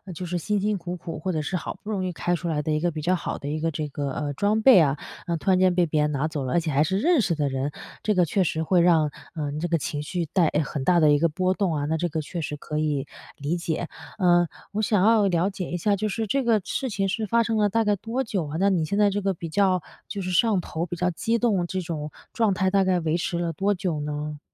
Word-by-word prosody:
就 180 Hz, -, -5 dB
是 175 Hz, 0 st, -2 dB
辛 205 Hz, +4 st, 0 dB
辛 210 Hz, +1 st, 0 dB
苦 180 Hz, 0 st, -5 dB
苦 165 Hz, -1 st, -7 dB
或 185 Hz, +3 st, -2 dB
者 155 Hz, -, -1 dB
是 185 Hz, -, -3 dB
好 165 Hz, -, -4 dB
不 215 Hz, -, -5 dB
容 190 Hz, -3 st, -1 dB
易 180 Hz, -, -2 dB
开 175 Hz, +1 st, -1 dB
出 175 Hz, +1 st, -5 dB
来 150 Hz, -2 st, -1 dB
的 155 Hz, -, -1 dB
一 150 Hz, -, +1 dB
个 175 Hz, +2 st, +1 dB
比 155 Hz, -1 st, -5 dB
较 175 Hz, +5 st, +1 dB
好 170 Hz, -, -4 dB
的 140 Hz, -, -7 dB
一 155 Hz, +1 st, -2 dB
个 165 Hz, +1 st, 0 dB
这 155 Hz, -1 st, -3 dB
个， 140 Hz, 0 st, -3 dB
呃， 145 Hz, +1 st, -3 dB
装 205 Hz, +7 st, +1 dB
备 255 Hz, -8 st, +8 dB
啊， 145 Hz, -2 st, +3 dB, 0.3 s
那 170 Hz, -1 st, 0 dB
突 190 Hz, -, 0 dB
然 185 Hz, -, +4 dB
间 185 Hz, -1 st, +4 dB
被 175 Hz, -1 st, +4 dB
别 155 Hz, -1 st, 0 dB
人 150 Hz, 0 st, +1 dB
拿 145 Hz, +2 st, 0 dB
走 150 Hz, -4 st, -4 dB
了， 125 Hz, -, -2 dB
而 175 Hz, -, +4 dB
且 160 Hz, -2 st, -2 dB
还 140 Hz, +3 st, +3 dB
是 190 Hz, +5 st, 0 dB
认 320 Hz, -, +3 dB
识 170 Hz, -5 st, 0 dB
的 145 Hz, -2 st, 0 dB
人， 135 Hz, +2 st, -2 dB, 0.3 s
这 210 Hz, -2 st, +1 dB
个 180 Hz, -2 st, +4 dB
确 190 Hz, +5 st, +1 dB
实 160 Hz, -1 st, -1 dB
会 175 Hz, +1 st, +3 dB
让， 160 Hz, -4 st, +4 dB, 0.2 s
呃， 145 Hz, -2 st, -3 dB
这 175 Hz, -, 0 dB
个 165 Hz, 0 st, +2 dB
情 150 Hz, -2 st, -3 dB
绪 170 Hz, +2 st, -3 dB
带 165 Hz, +1 st, +2 dB
诶， 150 Hz, -, 0 dB
很 140 Hz, -1 st, -4 dB
大 175 Hz, +2 st, +4 dB
的 150 Hz, -2 st, +5 dB
一 145 Hz, -, +4 dB
个 170 Hz, 0 st, +3 dB
波 185 Hz, +3 st, 0 dB
动 185 Hz, -5 st, 0 dB
啊， 145 Hz, 0 st, -1 dB
那 160 Hz, +2 st, 0 dB
这 175 Hz, +2 st, -1 dB
个 155 Hz, 0 st, -2 dB
确 170 Hz, +3 st, -5 dB
实 150 Hz, 0 st, -4 dB
可 150 Hz, +1 st, -4 dB
以 145 Hz, -3 st, 0 dB, 0.3 s
理 145 Hz, +4 st, -2 dB
解。 170 Hz, -1 st, -2 dB, 0.3 s
嗯， 175 Hz, -3 st, +4 dB, 0.2 s
我 215 Hz, +1 st, -1 dB
想 210 Hz, -3 st, +2 dB
要 220 Hz, -3 st, +5 dB
了 180 Hz, +1 st, +2 dB
解 185 Hz, -2 st, -5 dB
一 175 Hz, -, -2 dB
下， 200 Hz, +4 st, +1 dB
就 215 Hz, +2 st, -2 dB
是 220 Hz, +3 st, -2 dB
这 270 Hz, +6 st, 0 dB
个 225 Hz, -3 st, +3 dB
事 270 Hz, -5 st, -2 dB
情 195 Hz, -2 st, -1 dB
是 210 Hz, +2 st, -2 dB
发 230 Hz, +2 st, +3 dB
生 225 Hz, -1 st, -1 dB
了 205 Hz, -1 st, +3 dB
大 225 Hz, +3 st, +2 dB
概 210 Hz, -1 st, +2 dB
多 235 Hz, +6 st, -2 dB
久 190 Hz, -, -2 dB
啊， 155 Hz, +3 st, -4 dB
那 200 Hz, +1 st, +3 dB
你 170 Hz, -4 st, +1 dB
现 200 Hz, +6 st, -2 dB
在 205 Hz, -1 st, +4 dB
这 205 Hz, +1 st, -1 dB
个 195 Hz, -2 st, 0 dB
比 165 Hz, -, -6 dB
较 185 Hz, +1 st, +2 dB, 0.2 s
就 200 Hz, -2 st, -4 dB
是 185 Hz, -, -3 dB
上 210 Hz, +1 st, +3 dB
头 170 Hz, 0 st, -4 dB
比 175 Hz, -, -4 dB
较 180 Hz, +1 st, 0 dB
激 225 Hz, +8 st, 0 dB
动 205 Hz, -7 st, +1 dB
这 185 Hz, +1 st, -2 dB
种 155 Hz, -3 st, -5 dB, 0.2 s
状 220 Hz, -4 st, +2 dB
态 190 Hz, 0 st, +1 dB
大 195 Hz, 0 st, +3 dB
概 185 Hz, -1 st, +2 dB
维 160 Hz, +1 st, 0 dB
持 175 Hz, 0 st, -2 dB
了 170 Hz, -1 st, -1 dB
多 195 Hz, +6 st, +1 dB
久 175 Hz, -4 st, -2 dB
呢？ 150 Hz, 0 st, -4 dB
175 Hz, 320 characters per minute, -25 LUFS, 155-195 Hz, 0.3 s, 备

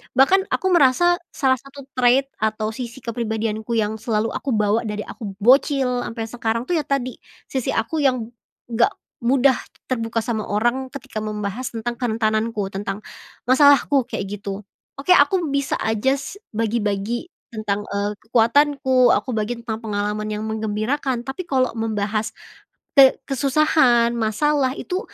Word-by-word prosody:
bahkan 275 Hz, +9 st, +5 dB
aku 375 Hz, -, 0 dB
merasa 350 Hz, +3 st, +4 dB, 0.2 s
salah 260 Hz, -2 st, +2 dB
satu 275 Hz, +2 st, -12 dB
trade 255 Hz, +2 st, +3 dB
atau 215 Hz, 0 st, -1 dB
sisi 235 Hz, +2 st, -7 dB
kepribadianku 220 Hz, -1 st, -2 dB
yang 220 Hz, 0 st, 0 dB
selalu 220 Hz, 0 st, -1 dB
aku 265 Hz, -5 st, -2 dB
bawa 215 Hz, +2 st, +1 dB
dari 210 Hz, 0 st, -3 dB
aku 200 Hz, -4 st, -8 dB
bocil 250 Hz, +3 st, +3 dB
ampe 230 Hz, -1 st, -4 dB
sekarang 230 Hz, 0 st, -2 dB
tuh 335 Hz, +5 st, 0 dB
ya 295 Hz, -, -5 dB
tadi, 255 Hz, -3 st, -2 dB, 0.3 s
sisi 260 Hz, -3 st, -1 dB
aku 310 Hz, +8 st, -1 dB
yang, 255 Hz, -5 st, +1 dB, 0.4 s
gak 230 Hz, +1 st, +2 dB, 0.3 s
mudah 260 Hz, +2 st, +4 dB, 0.4 s
terbuka 230 Hz, -2 st, -1 dB
sama 220 Hz, -2 st, -3 dB
orang 240 Hz, +6 st, 0 dB
ketika 265 Hz, -5 st, -6 dB
membahas 215 Hz, +3 st, -4 dB
tentang 235 Hz, +1 st, -3 dB
kerentananku 220 Hz, -3 st, -1 dB
tentang 200 Hz, +1 st, -5 dB, 0.4 s
masalahku 280 Hz, 0 st, +4 dB
kayak -, -, -3 dB, 0.2 s
gitu, 200 Hz, 0 st, -6 dB, 0.3 s
oke 280 Hz, +6 st, -1 dB
aku 350 Hz, +5 st, +4 dB
bisa 280 Hz, -1 st, 0 dB
aja 220 Hz, +5 st, +1 dB
s 280 Hz, +8 st, -8 dB, 0.2 s
bagi-bagi 220 Hz, -, -1 dB, 0.3 s
tentang, 210 Hz, -2 st, -2 dB
eee, 205 Hz, +1 st, -3 dB
kekuatanku, 255 Hz, +3 st, +3 dB
aku -, -, -1 dB
bagi 220 Hz, -1 st, -1 dB
tentang 225 Hz, -2 st, -4 dB
pengalaman 210 Hz, -1 st, -3 dB
yang 210 Hz, 0 st, -3 dB
menggembirakan 220 Hz, +5 st, -2 dB
tapi 270 Hz, +8 st, -6 dB
kalau 260 Hz, -5 st, +1 dB
membahas, 215 Hz, -1 st, -2 dB, 0.6 s
te 270 Hz, -3 st, +7 dB
kesusahan, 270 Hz, -3 st, +3 dB
masalah, 260 Hz, +5 st, +1 dB
itu 365 Hz, +1 st, -3 dB
235 Hz, 140 wpm, -22 LUFS, 215-270 Hz, 0.6 s, te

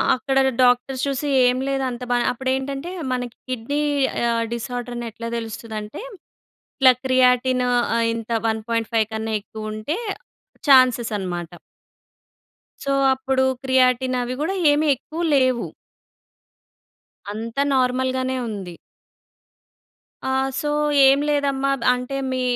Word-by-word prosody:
అక్కడగ 270 Hz, +1 st, +1 dB, 0.2 s
doctors 250 Hz, +1 st, +2 dB
చూసి, 280 Hz, +1 st, -2 dB, 0.2 s
ఏం 250 Hz, +1 st, +2 dB
లేదు. 270 Hz, -1 st, -1 dB
అంత 250 Hz, 0 st, -6 dB
బా 245 Hz, -, +3 dB
అప్పుడేంటంటే, 265 Hz, +5 st, -3 dB, 0.2 s
మనకి 245 Hz, -1 st, -4 dB
కిడ్నీ 255 Hz, +4 st, -2 dB, 0.5 s
ఆహ్, 230 Hz, 0 st, +1 dB
డిసార్దరనెట్లా 240 Hz, -1 st, -5 dB
తెలుస్తదంటే, 220 Hz, -, -6 dB, 0.8 s
ఇట్లా 260 Hz, -1 st, +7 dB
క్రియాటిన్ 255 Hz, 0 st, +3 dB
ఆహ్, 235 Hz, -1 st, +1 dB
ఇంత 230 Hz, -1 st, -6 dB, 0.2 s
1.5 225 Hz, 0 st, 0 dB
కన్నా 220 Hz, 0 st, -3 dB
ఎక్కువుంటే 215 Hz, -, -5 dB, 0.7 s
ఛాన్సెసనమాట. 215 Hz, -, +3 dB, 1.3 s
సో, 275 Hz, -, -1 dB, 0.2 s
అప్పుడు 265 Hz, 0 st, 0 dB, 0.2 s
క్రియాటిన్ 255 Hz, -1 st, +2 dB
అవి 245 Hz, +1 st, -4 dB
గూడా 385 Hz, +6 st, -1 dB, 0.2 s
ఏమి 300 Hz, +1 st, +2 dB
ఎక్కువ 315 Hz, +6 st, -7 dB
లేవు. 255 Hz, -3 st, +2 dB, 1.7 s
అంతా 230 Hz, +5 st, -3 dB
నార్మల్‌గానే 260 Hz, 0 st, 0 dB
ఉంది. 195 Hz, -5 st, -6 dB, 1.5 s
ఆ! 265 Hz, -, -1 dB, 0.3 s
సో, 295 Hz, -, -2 dB, 0.4 s
"ఏం 270 Hz, +1 st, +5 dB
లేదమ్మా. 275 Hz, -2 st, +1 dB, 0.2 s
అంటే, 250 Hz, +2 st, -4 dB
మీ 255 Hz, -, -1 dB
250 Hz, 100 wpm, -22 LUFS, 230-265 Hz, 1.7 s, ఇట్లా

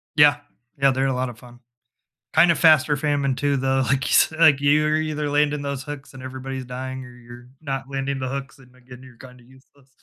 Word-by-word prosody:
Yeah. 145 Hz, -1 st, +6 dB, 0.4 s
Yeah, 135 Hz, -1 st, +5 dB
they're 135 Hz, +1 st, 0 dB
a 135 Hz, -, 0 dB
lot 125 Hz, 0 st, -2 dB
of 110 Hz, -3 st, -12 dB
fun. 120 Hz, 0 st, -16 dB, 0.7 s
Kind 170 Hz, -, +5 dB
of -, -, -1 dB
fast 155 Hz, -2 st, +5 dB
or 145 Hz, -, +1 dB
famine 140 Hz, -3 st, 0 dB
too, 140 Hz, 0 st, 0 dB
though, 135 Hz, 0 st, 0 dB
like, 130 Hz, 0 st, +1 dB
you -, -, -2 dB
s -, -, +4 dB
like, 155 Hz, -4 st, +5 dB
you're 150 Hz, +2 st, +3 dB
either 150 Hz, -1 st, -2 dB
landing 145 Hz, 0 st, +1 dB
those 140 Hz, -2 st, -4 dB
hooks 145 Hz, -2 st, -9 dB
and 130 Hz, -, -11 dB
everybody's 130 Hz, 0 st, -7 dB
dying 130 Hz, +1 st, -6 dB
or -, -, -12 dB
you're 120 Hz, 0 st, -14 dB
not 135 Hz, -3 st, -4 dB
landing 135 Hz, 0 st, -3 dB
the 130 Hz, -, -3 dB
hooks 135 Hz, 0 st, -7 dB
and, 125 Hz, -1 st, -20 dB
again, 125 Hz, 0 st, -15 dB
you're 130 Hz, -3 st, -16 dB
kinda 125 Hz, -1 st, -15 dB
useless. 130 Hz, +1 st, -23 dB
135 Hz, 220 wpm, -22 LUFS, 130-145 Hz, 0.7 s, Yeah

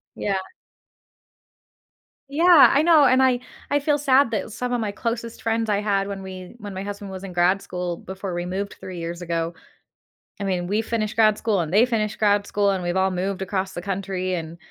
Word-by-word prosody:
Yeah. 200 Hz, -1 st, -1 dB, 1.9 s
Yeah, 330 Hz, +2 st, +7 dB
I 285 Hz, -, +4 dB
know, 325 Hz, -3 st, +6 dB
and 260 Hz, +1 st, +5 dB
I 255 Hz, -2 st, +3 dB, 0.3 s
I 290 Hz, -, +2 dB
feel 290 Hz, +1 st, +1 dB
sad 275 Hz, -3 st, +3 dB
that 220 Hz, 0 st, -2 dB
some 250 Hz, +2 st, -3 dB
of 245 Hz, -, 0 dB
my 215 Hz, -3 st, -2 dB
closest 230 Hz, +2 st, -4 dB
friends 225 Hz, 0 st, 0 dB
I 205 Hz, -1 st, +1 dB
had 200 Hz, -1 st, 0 dB
when 195 Hz, -1 st, -6 dB
we 185 Hz, +1 st, -9 dB
when 205 Hz, -3 st, -8 dB
my 190 Hz, -, -5 dB
husband 205 Hz, -1 st, -6 dB
was 190 Hz, 0 st, -7 dB
in 185 Hz, -2 st, -7 dB
grad 180 Hz, +3 st, +3 dB
school 180 Hz, -2 st, -4 dB
before 190 Hz, 0 st, -6 dB
we 175 Hz, 0 st, -3 dB
moved 195 Hz, +3 st, -4 dB
3 185 Hz, -1 st, -8 dB
years 170 Hz, +1 st, -5 dB
ago, 170 Hz, -1 st, -2 dB, 0.9 s
I -, -, -3 dB
mean, 180 Hz, -3 st, -1 dB
we 210 Hz, +3 st, +1 dB
finished 220 Hz, -2 st, -2 dB
grad 215 Hz, -2 st, +4 dB
school 210 Hz, -5 st, 0 dB
and 165 Hz, 0 st, -4 dB
they 215 Hz, +4 st, +6 dB
finished 220 Hz, -4 st, -2 dB
grad 205 Hz, -1 st, +3 dB
school, 200 Hz, 0 st, +1 dB
and 190 Hz, -2 st, -2 dB
we've 175 Hz, +1 st, -1 dB
all 190 Hz, 0 st, +3 dB
moved 185 Hz, +1 st, -2 dB
across 190 Hz, 0 st, -2 dB
the 175 Hz, -, -5 dB
country 185 Hz, -1 st, -3 dB
and 165 Hz, -1 st, -6 dB
200 Hz, 210 wpm, -23 LUFS, 185-225 Hz, 1.9 s, Yeah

